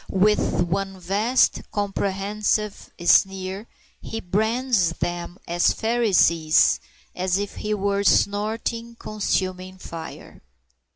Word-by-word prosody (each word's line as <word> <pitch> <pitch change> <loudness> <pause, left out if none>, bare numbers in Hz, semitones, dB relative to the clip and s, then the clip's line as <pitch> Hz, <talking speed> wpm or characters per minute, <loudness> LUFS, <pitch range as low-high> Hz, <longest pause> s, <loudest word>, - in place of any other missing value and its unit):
With 195 -2 +2
one 195 +2 -3
vast 205 +8 +2
comprehensive 205 +1 -2 0.2
sneer 195 +3 +2 0.3
he 225 - -5
brands 220 -1 +1
them 175 +1 -4
as 175 +1 +2
Pharisees, 190 -9 +3 0.4
as 185 0 0
if 205 0 -4
he 210 0 -2
were 200 0 0
snorting 220 +4 0
consuming 185 -4 -3
fire. 165 -3 -9
200 Hz, 95 wpm, -23 LUFS, 185-215 Hz, 0.4 s, Pharisees